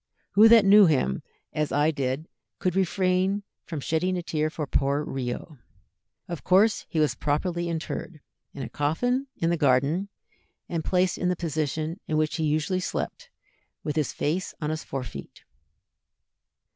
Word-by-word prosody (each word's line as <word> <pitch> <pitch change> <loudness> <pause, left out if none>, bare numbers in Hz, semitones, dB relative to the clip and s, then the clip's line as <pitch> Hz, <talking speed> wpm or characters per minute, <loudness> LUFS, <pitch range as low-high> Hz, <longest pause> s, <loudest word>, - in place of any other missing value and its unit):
Who 215 +2 +7
that 225 -2 +7
knew 200 0 +8
him 130 - +1 0.3
as 150 -1 -1
I 150 +2 +3
did 140 +2 -2 0.3
could 185 -1 -1
refrain 190 +1 +1 0.2
from 160 -4 -5
shedding 175 +6 0
a 175 - -3
tear 155 -2 -1
for 155 -1 -4
poor 140 +1 +1
Rio?" 135 +1 -5 0.7
Of 170 -3 -6
course 205 +4 +3
he 160 - -1
was 150 -1 +3
properly 170 +4 -1
interred, 160 0 -4 0.3
in 140 - -6
a - - -4
coffin, 245 - 0
in 165 0 +1
the 170 - +1
garden, 145 +8 +2 0.6
and 165 -2 -2
placed 180 +1 +1
in 180 - +1
the 180 - +1
position 160 +1 -2
in 155 - 0
which 155 +1 0
he 160 - -1
usually 155 +5 +1
slept, - - -4 0.5
with 150 - -2
his 155 -3 0
face 170 +5 -2
on 150 -2 -2
his 155 0 -4
fore 135 -1 -4
feet. 70 - -10
160 Hz, 160 wpm, -26 LUFS, 150-185 Hz, 0.7 s, knew